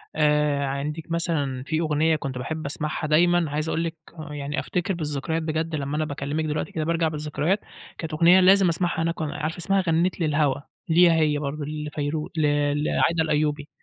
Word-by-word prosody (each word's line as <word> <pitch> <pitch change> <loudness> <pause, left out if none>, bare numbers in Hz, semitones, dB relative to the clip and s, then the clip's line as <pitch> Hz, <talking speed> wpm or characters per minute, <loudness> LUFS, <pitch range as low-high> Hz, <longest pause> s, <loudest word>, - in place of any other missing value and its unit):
آآ 150 -2 +2
عندِك 150 +4 -4
مثلًا 145 -6 -1
في 155 +3 -1
أغنية 160 0 +2
كنت 135 -4 -4
باحب 155 +5 -4
أسمعها 150 +2 -3
دايمًا 170 +1 +3
عايز 150 +2 -2
أقول 165 - 0
لِك 165 -1 -3 0.4
يعني 145 0 -3
أفتكر 180 +2 -2
بالذكريات 155 0 -2
بجد 160 +1 -2
لمّا 145 0 -3
أنا 155 - 0
باكلمِك 145 +2 -3
دلوقتي 150 0 -2
كده 160 - -2
بارجع 165 0 +1
بالذكريات، 155 +5 -1 0.4
كانت 160 -1 -5
أغنية 170 +4 +6
لازم 190 0 +6
أسمعها 170 -1 0
هناك 165 0 -2
وأنا 155 -2 -3
عارفة 155 +3 -3
اسمها 195 +3 +1
غنّيت 170 +3 +1
للهوا، 150 -3 +1 0.3
ليها 170 +1 +6
هي 155 -2 +2
برضه 145 +1 -4
لفيروز 150 0 -3
ل - - +2 0.4
لعايدة 165 +1 +2
الأيوبي، 150 -1 0
155 Hz, 175 wpm, -24 LUFS, 150-165 Hz, 0.4 s, أغنية